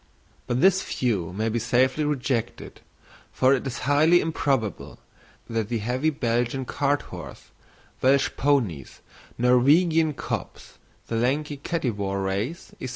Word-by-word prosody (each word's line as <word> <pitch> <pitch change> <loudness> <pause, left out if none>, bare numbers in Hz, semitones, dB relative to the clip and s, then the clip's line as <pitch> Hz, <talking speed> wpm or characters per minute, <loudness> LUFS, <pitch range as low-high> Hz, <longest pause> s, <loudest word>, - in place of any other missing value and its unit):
But 125 +1 0
this 190 +1 +5
view 100 -10 -2
may 110 +4 -2
be 115 +1 0
safely 130 +5 +2
rejected, 130 -5 -3 0.5
for 130 +1 +3
it 135 0 -1
is 125 - -5
highly 155 +5 +5
improbable 135 - -2 0.5
that 115 -2 -2
the 120 - -1
heavy 125 +8 0
Belgian 125 -2 -1
cart 145 +2 0
horse, 85 -7 -10 0.5
Welsh 135 +1 +3
ponies, 120 - 0 0.4
Norwegian 150 +6 +3
cobs, - - -6 0.3
the 115 - -3
lanky 145 +5 0
Kattywar 105 - -2
race, 105 - -3
&c. - - -3
130 Hz, 125 wpm, -25 LUFS, 115-145 Hz, 0.5 s, this